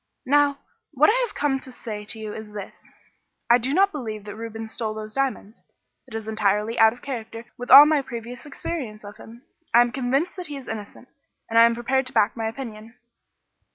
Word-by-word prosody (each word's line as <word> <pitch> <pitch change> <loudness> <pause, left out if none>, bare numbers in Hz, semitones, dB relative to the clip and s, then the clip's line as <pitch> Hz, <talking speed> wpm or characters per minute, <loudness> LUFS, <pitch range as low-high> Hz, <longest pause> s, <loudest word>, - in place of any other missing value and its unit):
Now, 285 +1 +3 0.4
what 300 +7 +5
I - - +1
have 415 - -15
come 285 -2 0
to 260 - -12
say 215 -4 -7
to 225 - -5
you 215 -1 -6
is 215 -1 -9
this: 205 -2 -9 0.6
I 240 - +7
do 250 +3 -1
not 390 +6 +3
believe 220 -8 -6
that 205 -1 -7
Reuben 225 0 -6
stole 220 -1 -4
those 215 0 -6
diamonds. 260 -5 -3 0.4
It 230 - -10
is 220 -1 -5
entirely 215 +1 0
out 220 0 +7
of 240 - -14
character 230 -3 -6
with 245 0 -8
all 285 - +12
my 300 -1 +3
previous 245 +1 -8
experience 265 -7 -6
of 205 0 -10
him. 235 +3 -14 0.3
I 240 - +9
am 240 0 +2
convinced 270 +9 -1
that 360 -2 -6
he 290 -2 -6
is 270 - -11
innocent, 220 +3 -8 0.4
and 230 - +5
I 230 - +9
am 235 0 +2
prepared 255 +2 0
to - - -8
back 205 - +2
my 225 -2 -2
opinion." 225 -1 -8
235 Hz, 210 wpm, -24 LUFS, 220-270 Hz, 0.6 s, all